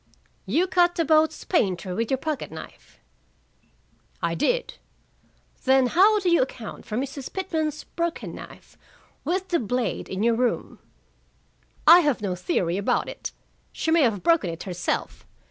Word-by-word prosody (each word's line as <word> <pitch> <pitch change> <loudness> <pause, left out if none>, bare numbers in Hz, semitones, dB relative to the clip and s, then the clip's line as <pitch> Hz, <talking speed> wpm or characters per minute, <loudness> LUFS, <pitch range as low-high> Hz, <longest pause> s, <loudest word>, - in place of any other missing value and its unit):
"You 305 - +2
cut 350 -1 +3
the 330 - +1
boat's 310 +1 +3
painter 185 - 0
with 225 +4 -2
your 265 - +1
pocket 305 0 -3
knife?" - - -12 1.2
"I - - -1
did." - - -1 0.9
"Then 265 0 +5
how 390 - +5
do 375 - -3
you 340 - +5
account 240 -4 -5
for 215 - -3
Mrs. 270 +1 -4
Pitman's 315 -5 -2
broken 340 -1 -4
knife, - - -12 0.4
with 370 +5 -2
the 345 - +2
blade 245 +1 -2
in 190 +2 -2
your 235 0 +4
room?" 245 +1 -1 1.1
"I 335 +3 +10
have 295 -7 +1
no 200 -3 -2
theory 180 0 -1
about 200 - 0
it. - - -6 0.4
She 320 - -2
may 330 0 +5
have 220 -8 +1
broken 330 - +3
it 165 0 -6
herself. 180 -2 -3
275 Hz, 150 wpm, -25 LUFS, 215-335 Hz, 1.2 s, I